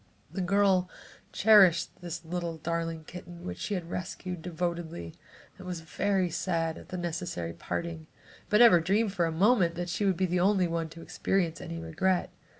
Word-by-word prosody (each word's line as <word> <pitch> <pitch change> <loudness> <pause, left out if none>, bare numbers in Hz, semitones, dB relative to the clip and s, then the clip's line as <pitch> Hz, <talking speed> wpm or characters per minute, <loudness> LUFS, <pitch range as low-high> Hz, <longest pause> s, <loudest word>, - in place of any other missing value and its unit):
The 195 - -3
girl 190 -1 +3 0.4
cherished 190 -6 +5
this 170 -1 -6
little 170 -1 -3
darling 165 0 -3
kitten 175 +1 -10
which 90 0 -5
she 205 - -2
had 175 -2 -5
rescued, 180 -1 -5
devotedly, 170 - -4 0.5
and 185 - -9
was 175 -2 -4
very 185 +2 0
sad 165 -2 -1
at - - -14
the 185 - -4
necessary 165 - -3
parting, 165 - -5 0.4
but 210 +2 +5
never 225 -8 +8
dreamed 200 +4 +1
for 175 -4 +1
a - - -2
moment 180 0 +3
but 175 - -3
that 175 - -4
she 175 +4 -1
would 190 -3 +2
be 190 - +2
the 180 0 0
only 190 0 +3
one 165 -1 -2
to 165 +1 -11
experience 175 -4 -1
any 165 -2 -6
regret. 170 +3 0
175 Hz, 180 wpm, -29 LUFS, 165-185 Hz, 0.5 s, never